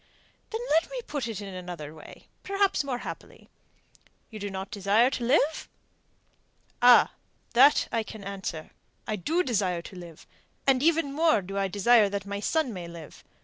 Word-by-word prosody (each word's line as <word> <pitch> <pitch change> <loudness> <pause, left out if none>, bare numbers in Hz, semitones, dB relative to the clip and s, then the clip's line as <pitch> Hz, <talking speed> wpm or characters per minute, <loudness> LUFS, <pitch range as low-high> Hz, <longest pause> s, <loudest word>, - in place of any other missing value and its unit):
"Then 450 +1 -4
let 325 +2 +3
me - - -5
put 285 -5 -3
it 220 -3 -5
in 195 -2 -7
another 175 -5 -7
way 160 - -14 0.2
perhaps 395 -4 +1
more 265 -3 -3
happily: - - -9 0.8
You 215 - -8
do 205 0 -4
not 190 0 -6
desire 210 +5 +3
to 250 - -3
live?" 285 +5 +1 1.1
"Ah, 245 0 +7 0.4
that 290 - +6
I 230 - +1
can 220 -1 -9
answer. 190 -5 -6 0.3
I 215 - -2
do 320 - 0
desire 190 - -1
to 190 - -11
live; 170 -3 -11 0.4
and 265 -2 +3
even 320 -2 +2
more 310 - +3
do 195 +2 -7
I 195 0 0
desire 205 +2 +4
that 200 -1 -4
my 200 0 -4
son 270 +2 0
may 180 -3 -7
live. 170 -2 -11
210 Hz, 170 wpm, -27 LUFS, 190-275 Hz, 1.1 s, Ah